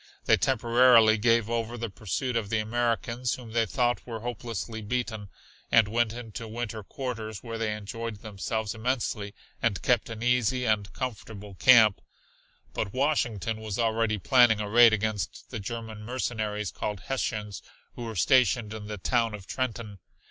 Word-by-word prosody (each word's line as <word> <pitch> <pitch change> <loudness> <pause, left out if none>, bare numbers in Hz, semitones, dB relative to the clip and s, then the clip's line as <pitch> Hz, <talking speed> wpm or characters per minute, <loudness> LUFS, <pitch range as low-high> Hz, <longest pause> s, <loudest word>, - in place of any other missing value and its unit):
They - - +6
temporarily 120 -3 +5
gave 115 0 +3
over 115 0 -2
the 115 -2 -4
pursuit 110 +6 -3
of 110 -4 -1
the 110 - +1
Americans, 115 +2 -1
whom 120 -3 -11
they 115 0 +1
thought 120 +2 0
were 115 -2 -5
hopelessly 115 -1 -5
beaten, 110 -2 -3 0.4
and 110 -2 +6
went 115 +1 +1
into 115 -1 -7
winter 115 -1 -5
quarters, 110 -2 -6
where 115 -2 -5
they 110 -2 -1
enjoyed 110 +1 -6
themselves 110 +1 -3
immensely 110 -3 -2 0.3
and 100 -6 0
kept 120 -3 +2
an 115 0 -6
easy 125 +1 +2
and 105 -3 +1
a - - -18
comfortable 105 -5 -6
camp. 110 0 +6 0.7
But 95 - -3
Washington 120 - 0
was 110 -3 -4
already 115 -2 +1
planning 120 +1 +5
a 105 - -2
raid 115 +2 +7
against 110 -2 -2
the - - -4
German 110 +1 -6
mercenaries 110 -3 -3
called 105 -3 -4
Hessians 105 -6 -3 0.3
who 120 - -7
were 115 -1 -6
stationed 115 0 +3
in 105 -1 -7
the 105 0 -5
town 115 +2 0
of 100 -2 -11
Trenton. 115 -4 -4
115 Hz, 160 wpm, -27 LUFS, 105-120 Hz, 0.7 s, raid